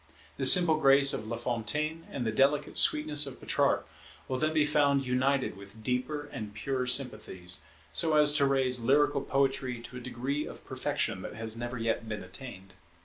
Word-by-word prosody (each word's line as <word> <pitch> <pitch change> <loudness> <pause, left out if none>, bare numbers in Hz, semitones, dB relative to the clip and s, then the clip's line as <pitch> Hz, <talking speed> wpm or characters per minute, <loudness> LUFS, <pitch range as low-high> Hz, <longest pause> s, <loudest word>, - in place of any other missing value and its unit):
The 135 - +2
simple 165 +1 +7
grace 140 -1 +5
of 110 - -4
Lafontaine 120 +8 -3
and 125 - -4
the 110 - 0
delicate 140 +5 +1
sweetness 150 -1 +3
of 135 - -8
Petrarch - - 0 0.4
will 130 -1 -3
then 155 0 0
be 155 -1 +2
found 140 -2 +2
united 130 +2 0
with 100 +3 -14
deeper 130 +5 -2
and 105 -2 -7
purer 130 -2 -3
sympathies, 105 -9 -1 0.3
so 160 -2 +1
as 150 -1 +6
to 140 -2 +3
raise 130 -2 +3
lyrical 140 +2 +2
poetry 135 -3 -1
to 125 +1 -9
a - - -8
degree 130 +4 -4
of - - -11
perfection 130 -7 -2
that - - -8
has 110 0 -3
never 120 +1 -5
yet 115 0 -2
been 105 -3 -5
attained. 95 -1 -11
130 Hz, 175 wpm, -29 LUFS, 115-145 Hz, 0.4 s, simple